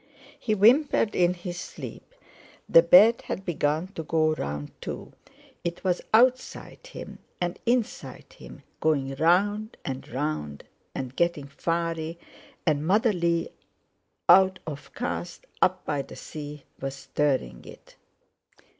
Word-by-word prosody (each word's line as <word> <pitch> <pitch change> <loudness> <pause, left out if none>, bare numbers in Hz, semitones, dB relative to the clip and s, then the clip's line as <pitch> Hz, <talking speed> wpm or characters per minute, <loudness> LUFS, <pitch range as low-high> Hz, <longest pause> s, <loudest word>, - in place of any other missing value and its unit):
He 215 - 0
whimpered 225 +2 +4
in 180 0 +3
his 175 0 -6
sleep. - - -9 0.5
The 165 - +8
bed 195 +7 +7
had 190 - -4
begun 160 +1 0
to 195 - -6
go 155 0 +2
round 75 - -4
too; - - -6 0.5
it 170 0 -4
was 180 -2 +1
outside 255 - +2
him - - -9 0.2
and 175 -1 -2
inside 240 -2 -2
him; - - -13 0.2
going 140 -4 +1
round 205 +7 +2
and 135 -1 -5
round, 125 - -3 0.3
and 130 -1 -5
getting 170 -4 0
fiery, 165 +3 -2 0.5
and 150 -3 +2
Mother 215 +4 +3
Lee 170 -2 0 0.8
out 190 +1 +7
of 145 -3 -8
Cast 180 -7 -4 0.2
up 185 0 +2
by 145 -2 -1
the - - -11
Sea 150 -1 -8 0.2
was 135 0 -4
stirring 135 - -1
it! - - -14
170 Hz, 130 wpm, -26 LUFS, 145-190 Hz, 0.8 s, The